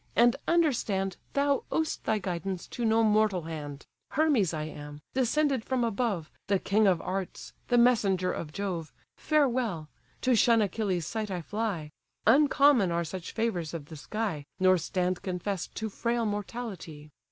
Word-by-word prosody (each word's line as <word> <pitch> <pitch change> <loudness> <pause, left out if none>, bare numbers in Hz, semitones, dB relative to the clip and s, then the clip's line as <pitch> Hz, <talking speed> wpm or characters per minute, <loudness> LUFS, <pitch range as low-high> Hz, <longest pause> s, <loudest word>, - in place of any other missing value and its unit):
and 240 +1 +5
understand 225 - +1 0.2
Thou 280 0 +2
ow'st 320 -1 -1
thy 220 - +2
guidance 185 -1 -3
to 240 - -5
no 225 0 +3
mortal 210 -4 +3
hand: 150 -3 -7 0.2
Hermes 275 - +2
I 155 -2 -3
am, 150 -1 -8
descended 265 0 +1
from 255 -1 0
above, 215 -8 -1 0.2
The 200 0 +3
king 205 +3 +2
of 180 -3 +3
arts, 190 0 -4
the 245 - +3
messenger 205 -7 +3
of 150 - -5
Jove, 175 -3 -4 0.2
Farewell: 245 - +1 0.3
to 255 -1 +3
shun 230 +1 +5
Achilles' 200 -4 0
sight 215 +4 -3
I 180 -3 -3
fly; 200 -7 -3 0.3
Uncommon 280 - +5
are 170 0 0
such 170 +2 -6
favours 185 -9 -1
of 155 -4 -6
the 160 - -8
sky, 160 -1 -3
Nor 185 -1 +5
stand 180 +2 -1
confess'd 185 0 -4
to 220 - -2
frail 235 +2 -1
mortality. 205 -8 -5
200 Hz, 150 wpm, -29 LUFS, 175-235 Hz, 0.3 s, and